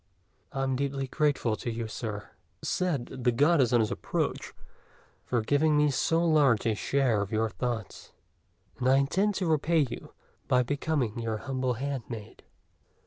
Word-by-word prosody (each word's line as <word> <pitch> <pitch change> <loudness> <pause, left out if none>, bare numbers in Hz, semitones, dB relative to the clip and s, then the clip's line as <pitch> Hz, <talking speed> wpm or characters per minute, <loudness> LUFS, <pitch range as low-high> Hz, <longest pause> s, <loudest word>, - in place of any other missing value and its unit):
"I 135 - -2
am 135 -1 0
deeply 135 0 -1
grateful 140 -6 +1
to - - -4
you, 115 0 -3
Sir," 105 -2 -6 0.3
said 165 -9 0 0.2
the 125 - +4
Goddess, 140 0 +3
on 120 -2 +4
his 110 - 0
approach, - - -2 0.8
"for 120 -2 +1
giving 150 +6 +2
me 150 -1 +4
so 165 +5 +1
large 145 -9 +4
a 115 - +2
share 120 -1 +1
of 100 - -4
your 110 0 +1
thoughts; 110 +1 -4 0.7
and 130 0 +2
I 135 - +6
intend 190 +10 +1
to 190 - -1
repay 160 -1 +2
you 120 - -8 0.4
by 125 0 +3
becoming 140 -4 -1
your 115 -1 -2
humble 130 0 -2
handmaid." 120 -4 -5
130 Hz, 155 wpm, -28 LUFS, 115-145 Hz, 0.8 s, I